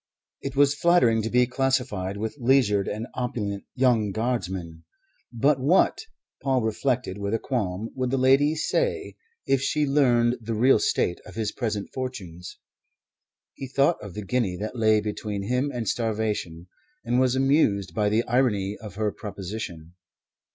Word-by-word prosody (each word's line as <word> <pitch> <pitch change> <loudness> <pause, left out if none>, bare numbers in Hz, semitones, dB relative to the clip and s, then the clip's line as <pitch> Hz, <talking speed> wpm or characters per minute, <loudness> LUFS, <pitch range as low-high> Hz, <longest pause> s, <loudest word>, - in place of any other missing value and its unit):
It 135 0 -5
was 140 0 +4
flattering 145 -9 +3
to 110 - -3
be 125 +1 +4
classified 125 -7 -1
with 110 +1 -4
leisured 120 -6 +3
and 110 +2 -3
opulent 105 -5 -3
young 120 -6 +2
Guardsmen; 95 -7 -3 0.5
but 135 +4 +2
what, 150 +9 +3 0.4
Paul 130 -3 +1
reflected 110 -2 -1
with 100 +2 -1
a - - +2
qualm, 110 -4 -3
would 130 -1 -2
the 135 - 0
kind - - -1
lady 140 +4 +4
say 485 - -1 0.3
if 135 -1 +2
she 150 +2 +1
learned 125 -4 +3
the 115 0 -3
real 125 +5 +4
state 90 - 0
of - - -12
his 110 -2 -2
present 105 -5 -3
fortunes? 95 -10 -6 1.0
He 135 - -7
thought 140 +5 +2
of 100 -3 -9
the 105 -1 -5
guinea 100 -4 0
that 105 +5 -5
lay 110 -2 +3
between 105 -1 -4
him 125 +7 0
and 120 -4 -4
starvation, 105 -7 -2 0.4
and 120 - +1
was 130 -1 +2
amused 130 - +2
by 105 +3 +1
the 110 +3 +2
irony 110 -6 +1
of 105 -4 -9
her 105 0 0
proposition. 95 -5 -7
115 Hz, 160 wpm, -25 LUFS, 105-130 Hz, 1.0 s, was